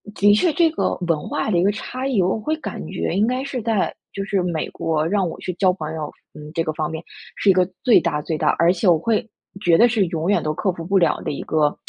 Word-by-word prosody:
的 205 Hz, +1 st, +5 dB
确 320 Hz, -, +3 dB
这 335 Hz, -1 st, +4 dB
个 -, -, 0 dB
文 155 Hz, -3 st, 0 dB
化 -, -, -2 dB
的 175 Hz, -, +2 dB
一 170 Hz, -, +3 dB
个 200 Hz, -, +3 dB
差 255 Hz, +5 st, -5 dB
异， 230 Hz, -8 st, +2 dB
我 190 Hz, +5 st, +1 dB
会 310 Hz, +8 st, -1 dB
感 -, -, -6 dB
觉 -, -, -3 dB
应 205 Hz, +3 st, +3 dB
该 255 Hz, +2 st, -1 dB
是 265 Hz, -4 st, -4 dB
在 220 Hz, -3 st, 0 dB, 0.2 s
就 195 Hz, -, -3 dB
是 195 Hz, -2 st, 0 dB
美 170 Hz, -3 st, -2 dB
国 160 Hz, -1 st, -1 dB
让 195 Hz, -1 st, +1 dB
我 -, -, -6 dB
去 185 Hz, -, -4 dB
交 185 Hz, +1 st, +3 dB
朋 160 Hz, -3 st, -6 dB
友， 150 Hz, -2 st, -5 dB, 0.2 s
嗯， 150 Hz, 0 st, -10 dB
这 165 Hz, -1 st, 0 dB
个 155 Hz, -, -2 dB
方 155 Hz, -1 st, -2 dB
面 160 Hz, 0 st, -6 dB, 0.3 s
是 200 Hz, -, +1 dB
一 -, -, +7 dB
个 180 Hz, -1 st, +3 dB, 0.2 s
最 245 Hz, -4 st, +6 dB
大 150 Hz, -3 st, -1 dB
最 160 Hz, +1 st, -3 dB
大， -, -, +1 dB
而 170 Hz, +1 st, +5 dB
且 185 Hz, +1 st, -1 dB
我 170 Hz, -2 st, +6 dB
会 225 Hz, +4 st, 0 dB, 0.4 s
觉 170 Hz, -4 st, +5 dB
得 235 Hz, -, +6 dB
是 220 Hz, -5 st, +2 dB
永 165 Hz, +1 st, -2 dB
远 205 Hz, -, +3 dB
都 155 Hz, -, -1 dB
克 190 Hz, +4 st, 0 dB
服 165 Hz, -2 st, -8 dB
不 195 Hz, +2 st, +2 dB
了 175 Hz, -, +2 dB
的 -, -, -3 dB
一 -, -, -5 dB
个 150 Hz, -2 st, +1 dB
185 Hz, 295 characters per minute, -21 LUFS, 160-215 Hz, 0.4 s, 一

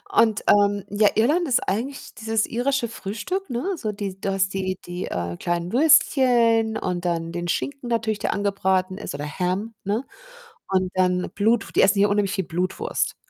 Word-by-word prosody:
und, 220 Hz, -2 st, +3 dB
ähm, 205 Hz, -1 st, +4 dB
ja, 205 Hz, +1 st, +4 dB
Irland 300 Hz, +10 st, +2 dB
ist 250 Hz, -, +3 dB
eigentlich 250 Hz, +8 st, -3 dB
dieses 220 Hz, 0 st, -1 dB
irische 245 Hz, +1 st, 0 dB
Frühstück, 230 Hz, -, -5 dB
ne, 260 Hz, +11 st, -2 dB
so 220 Hz, -10 st, -3 dB
die 195 Hz, -2 st, -6 dB
du 195 Hz, -, -1 dB
hast 195 Hz, 0 st, 0 dB
die 185 Hz, -1 st, -2 dB
die, 175 Hz, +1 st, -5 dB
äh, 85 Hz, -1 st, -4 dB
kleinen 175 Hz, +1 st, -2 dB
Würstchen 245 Hz, -6 st, +4 dB
und 180 Hz, -1 st, -3 dB
dann 165 Hz, -1 st, -1 dB
den 175 Hz, 0 st, -4 dB
Schinken 275 Hz, +7 st, -3 dB
natürlich, 220 Hz, -3 st, 0 dB
der -, -, -1 dB
angebraten 190 Hz, -2 st, 0 dB
ist -, -, -6 dB
oder 145 Hz, +1 st, -4 dB
Ham, 185 Hz, +8 st, -2 dB
ne, 215 Hz, +7 st, -1 dB, 0.6 s
und 185 Hz, -1 st, +1 dB
dann 180 Hz, -1 st, +1 dB
Blutw 225 Hz, +3 st, +1 dB
die -, -, +4 dB
essen 200 Hz, +1 st, +4 dB
hier 205 Hz, -, +4 dB
unheimlich 205 Hz, -1 st, +1 dB
viel 190 Hz, -, -1 dB
Blutwurst. 180 Hz, +3 st, -2 dB
205 Hz, 175 wpm, -23 LUFS, 185-230 Hz, 0.6 s, ähm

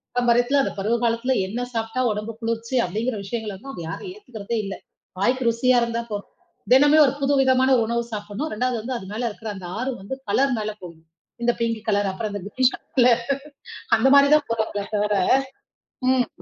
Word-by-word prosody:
பாரம்பரியத்துல, 245 Hz, +3 st, +3 dB
அந்த -, -, -3 dB
பருவ 220 Hz, +4 st, +1 dB
காலத்துல 235 Hz, +3 st, +1 dB
என்ன 240 Hz, +5 st, -3 dB
சாப்ட்டா 225 Hz, +3 st, -2 dB
உடம்புக்கு 215 Hz, +2 st, -5 dB
குளிர்ச்சி 230 Hz, +2 st, -2 dB
அப்டிங்கிற 220 Hz, +5 st, -2 dB
விஷயங்களலாம், 210 Hz, +1 st, -5 dB
அவங்க 180 Hz, -, -7 dB
யாரும் 265 Hz, -, -6 dB
ஏத்துக்குறதே 235 Hz, -, -6 dB
இல்ல. 195 Hz, -, -4 dB, 0.5 s
வாய்க்கு 245 Hz, +4 st, +1 dB
ருசியா 245 Hz, +2 st, +3 dB
இருந்தா 235 Hz, 0 st, -2 dB
போதும். 205 Hz, -1 st, -5 dB, 0.4 s
தினமும் 290 Hz, +3 st, +7 dB
ஒரு 270 Hz, -, +1 dB
புது 275 Hz, 0 st, +2 dB
விதமான 260 Hz, 0 st, +3 dB
ஒரு 230 Hz, -, +2 dB
உணவு 235 Hz, 0 st, 0 dB
சாப்பிடணும். 210 Hz, +9 st, -4 dB
2வது 250 Hz, 0 st, 0 dB
வந்து 250 Hz, +3 st, -4 dB
அது 190 Hz, -, -9 dB
மேல 235 Hz, +3 st, -3 dB
இருக்குற 220 Hz, +1 st, -8 dB
அந்த 180 Hz, -2 st, -8 dB
ஆர்வம், 250 Hz, -2 st, -3 dB
வந்து 265 Hz, +7 st, -5 dB
கலர் 270 Hz, -2 st, +2 dB
மேல 215 Hz, 0 st, -3 dB
போகணும். 165 Hz, -2 st, -12 dB, 0.4 s
இந்தப் 240 Hz, 0 st, +1 dB
பிங்க் 230 Hz, -2 st, -1 dB
கலர் 200 Hz, -2 st, +1 dB
அப்புறம் 215 Hz, +1 st, -4 dB
அந்த 205 Hz, -, -9 dB
க்ரீன் 255 Hz, 0 st, +4 dB
கலர்ல 250 Hz, -2 st, +2 dB, 0.9 s
அந்த 265 Hz, -, +3 dB
மாரிதான் 285 Hz, +1 st, +5 dB
போறாங்களே 220 Hz, -3 st, -2 dB
தவிர, 210 Hz, 0 st, +1 dB, 1.0 s
ம். 255 Hz, -1 st, +3 dB
235 Hz, 175 wpm, -23 LUFS, 210-255 Hz, 1.0 s, தினமும்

